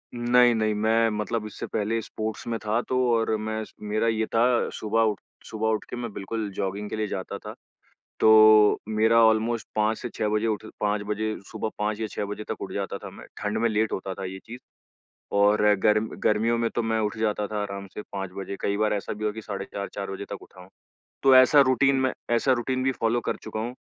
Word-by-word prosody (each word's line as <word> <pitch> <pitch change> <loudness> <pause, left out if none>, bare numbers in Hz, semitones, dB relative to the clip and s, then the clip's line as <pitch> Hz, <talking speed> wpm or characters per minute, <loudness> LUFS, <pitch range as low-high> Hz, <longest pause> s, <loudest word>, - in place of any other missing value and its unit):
नहीं, 120 0 +4
नहीं, 110 -1 +1
मैं 110 +2 +2
मतलब 105 +1 -2
इससे 105 - -6
पहले 110 +2 -1
स्पोर्ट्स 110 0 -5
में 115 -1 -1
था 110 +2 0
तो 130 - +1 0.2
और 115 -1 +1
मैं 110 +1 -3
स - - -14
मेरा 105 +2 -1
ये 110 -1 +1
था 120 +2 +2
सुबह 110 +1 0
उठ 105 - -8 0.3
सुबह 110 0 -2
उठ 110 -1 0
के - - -5
मैं 120 -2 -5
बिल्कुल 105 +2 -4
जॉगिंग 100 +2 -3
के - - -4
लिए 110 -1 -1
जाता 95 -2 -5
था। - - -9 0.7
तो 110 -1 +7
मेरा 110 +2 +4
ऑलमोस्ट 110 +1 +1
5 110 +1 +1
से 120 - -6
6 105 - 0
बजे 105 +1 0
उठ 110 0 -2
5 105 0 0
बजे, 110 +1 -1 0.2
सुबह 110 - -3
5 105 0 -1
या 110 - -2
6 - - -3
बजे 105 +1 -6
तक - - -4
उठ - - -5
जाता - - -3
था - - -9
मैं। - - -12 0.2
ठंड 105 +1 -1
में 115 +1 +2
लेट 110 +1 0
होता 95 0 -3
था 95 - -6
ये 95 +1 -6
चीज़ 120 +2 -9 0.8
और 105 +1 +4 0.2
गर्म 105 +1 +3 0.2
गर्मियों 115 +2 +2
में 115 0 +1
तो 120 - 0
मैं 110 0 0
उठ 105 +1 -2
जाता 105 -1 0
था 105 0 -3
आराम 100 -1 -5
से - - -5
5 95 -1 -4
बजे, 100 0 -5
कई 100 - 0
बार 110 0 +2
ऐसा 100 -3 -3
भी 110 +1 -6
हुआ 105 - 0
कि 110 - -7
साढ़े 100 -2 -5
4-4 100 0 -6
बजे 95 +1 -5
तक 100 - -7
उठा 95 - -15
हूँ। 90 - -14 0.5
तो 135 -1 +6
ऐसा 130 +3 +7
रूटीन 135 +2 +3
मैं 130 0 +1 0.2
ऐसा 125 +3 +3
रूटीन 130 +1 -1
भी 135 - +2
फॉलो 115 -1 0
कर - - 0
चुका 110 - -5
हूँ 120 +3 -4
110 Hz, 230 wpm, -26 LUFS, 105-115 Hz, 0.8 s, तो